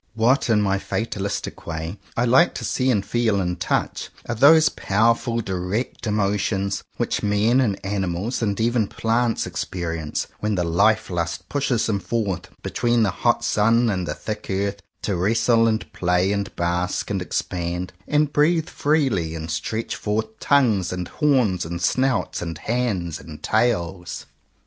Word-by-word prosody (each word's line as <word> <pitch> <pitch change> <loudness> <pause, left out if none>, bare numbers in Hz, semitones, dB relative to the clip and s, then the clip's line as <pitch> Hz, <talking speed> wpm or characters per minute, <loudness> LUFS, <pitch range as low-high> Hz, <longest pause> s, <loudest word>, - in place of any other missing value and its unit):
What, 120 +4 +2
in 105 -2 +4
my 95 -1 +1
fatalistic 100 -2 -4
way, 80 +4 -4 0.2
I 120 - +2
like 130 +8 +4
to - - -4
see 130 0 0
and 105 -5 +1
feel 115 -2 +1
and 90 -2 -2
touch, - - -1 0.2
are 120 - -1
those 155 +7 +6
power 110 +4 +2
ful 115 0 -3
direct 95 +6 -3
emotions, 100 -1 0
which - - -1
men 105 +5 +3
and 105 -6 0
animals, 95 +3 -2
and 100 -3 0
even 115 -1 +2
plants, 115 +2 0
experience, 80 -4 -3
when 105 -1 0
the 90 - 0
life 105 +6 +2
lust 85 -1 -3
pushes 135 -5 0
them 105 -3 0
forward 95 -4 -2
between 120 -1 +1
the 100 - +2
hot - - +1
sun 115 +2 +3
and 90 -3 -2
the - - -3
thick 105 -1 -6
earth, 100 +1 -1 0.2
to 100 - 0
wrestle, 115 +5 +3
and 110 0 -1
play, 90 +2 +1
and 100 -1 -2
bask, 90 +3 -1
and 95 -2 -1
expand, 90 +1 -3
and 150 0 +2
breathe 160 +2 +2
freely, 130 - +1
and 80 0 -5
stretch 110 +9 -3
forth 110 +1 -3
tongues 115 -11 +3
and 90 -1 -4
horns, 125 - +2
and 85 +1 -5
snouts, 130 +9 0
and 85 -2 -4
hands, 100 -8 -1
and 75 -2 -11
tails. 90 -7 0
105 Hz, 160 wpm, -23 LUFS, 90-115 Hz, 0.2 s, those